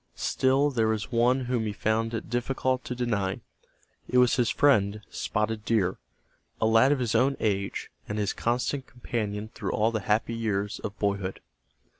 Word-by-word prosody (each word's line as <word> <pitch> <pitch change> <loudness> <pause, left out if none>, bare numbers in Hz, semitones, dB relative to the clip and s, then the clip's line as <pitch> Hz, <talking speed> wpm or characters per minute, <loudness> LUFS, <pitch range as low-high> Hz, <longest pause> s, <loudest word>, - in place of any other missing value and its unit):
Still 135 +2 +2
there 115 -4 +1
was 110 -1 -1
one 120 +3 +3
whom 120 -3 -1
he 105 - -2
found 110 +2 0
it 115 - -5
difficult 130 +2 -1
to 125 - -4
deny. 105 -6 -1 0.7
It 125 - +2
was 125 -1 +5
his 120 -3 +2
friend, 105 -7 +3
Spotted 110 0 -2
Deer, 100 -6 +1 0.6
a - - +2
lad 115 +4 +5
of 145 - +3
his 120 -3 -1
own 130 +4 +3
age, 100 -2 -1 0.2
and 105 - -2
his 105 -1 0
constant 125 +3 -1
companion 110 -4 -4
through - - -3
all 110 +2 +2
the 110 - -1
happy 105 +3 0
years 105 -3 -2
of 105 -1 -6
boyhood. 100 -2 -1
115 Hz, 170 wpm, -27 LUFS, 105-125 Hz, 0.7 s, was